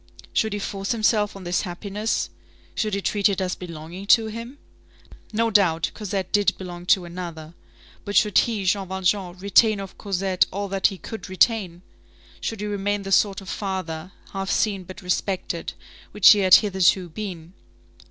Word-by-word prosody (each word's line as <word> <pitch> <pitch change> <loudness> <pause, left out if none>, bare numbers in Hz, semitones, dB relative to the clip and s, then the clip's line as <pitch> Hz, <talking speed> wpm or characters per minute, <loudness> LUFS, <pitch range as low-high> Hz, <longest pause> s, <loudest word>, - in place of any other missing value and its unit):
Should 220 -1 +1
he - - -1
force 195 +1 -3
himself 215 -2 +1
on 195 - -9
this 175 0 0
happiness? 205 +4 -3 0.4
Should 215 -3 -1
he 200 - -2
treat 205 0 +2
it 200 - -1
as 185 -1 -1
belonging 170 +2 -8
to 225 +1 +6
him? 230 +5 -7 0.7
No 225 +1 +1
doubt, 170 -6 +3
Cosette 195 -3 -4
did 205 -1 +2
belong 175 -1 -8
to 185 -1 +4
another; 170 -2 -7 0.5
but 205 - -5
should 210 +2 +3
he, 220 -5 -1
Jean 195 +1 +1
Valjean, 190 -1 -1
retain 200 +2 +4
of 195 -1 -9
Cosette 190 -2 +1
all 200 +1 -3
that 195 0 +3
he 195 - -6
could 220 +2 -8
retain? 185 -3 +1 0.6
Should 225 -2 -4
he - - -2
remain 205 0 -1
the 195 - -6
sort 195 0 +3
of 190 - -10
father, 185 -4 -4 0.2
half 195 0 -3
seen 200 -4 0
but 185 +3 -11
respected, 180 -1 -2 0.4
which 210 -2 +8
he 210 - +5
had 185 -2 +8
hitherto 190 -3 +3
been? 175 -2 -7
195 Hz, 170 wpm, -24 LUFS, 180-205 Hz, 0.7 s, which